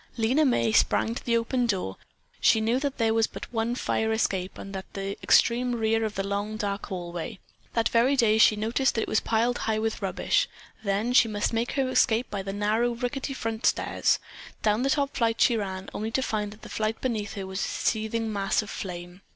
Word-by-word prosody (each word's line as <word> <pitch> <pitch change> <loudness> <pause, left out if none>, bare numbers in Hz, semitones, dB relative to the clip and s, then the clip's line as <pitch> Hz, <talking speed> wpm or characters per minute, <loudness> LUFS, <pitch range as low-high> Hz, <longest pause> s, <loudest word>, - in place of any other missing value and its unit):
Lena 250 +7 +3
May 240 -4 +2
sprang 225 0 +3
to - - -6
the 235 -1 +2
open 240 +1 0
door. 185 - -1 0.4
She 220 - +4
knew 230 +3 +1
there 260 -6 0
was 225 0 +3
but - - -9
one 230 +1 0
fire 220 -3 0
escape 190 -4 -1
and 195 - -8
that 190 - -3
at - - -35
the 195 0 -3
extreme 245 +1 +3
rear 225 0 +1
of 215 -1 -2
the 195 - -2
long, 205 +2 -2
dark 205 -2 -3
hallway. 175 +2 -5 0.4
That 230 -1 +2
very 240 +4 +3
day 220 -4 +3
she 215 - +6
had 210 - -6
noticed 245 +4 +1
that 225 - +1
it - - -5
was 215 - +2
piled 235 +2 +1
high 220 - +1
with 220 0 -2
rubbish. - - +1 0.3
Then 205 +4 0
she 245 - +6
must 210 +1 -1
make 230 +2 -1
her 270 -2 +1
escape 235 -2 +2
by 200 - -2
the 195 0 -5
narrow, 215 +4 +1
rickety 265 +3 -3
front 225 -2 -1
stairs. - - +2 0.5
Down 215 +1 +2
the 270 - +1
top 280 0 0
flight 230 -2 +1
she 240 - +5
ran, 190 -3 -4
only 215 +1 -3
to 260 +3 0
find 210 -3 -1
that 215 - -15
the - - -8
flight 215 0 -2
beneath 220 -5 -2
her 195 -2 -4
was 190 0 -5
a - - -1
seething 220 0 -1
mass 200 +1 +1
of 210 - -9
flame. 175 0 -7
220 Hz, 220 wpm, -27 LUFS, 205-235 Hz, 0.5 s, she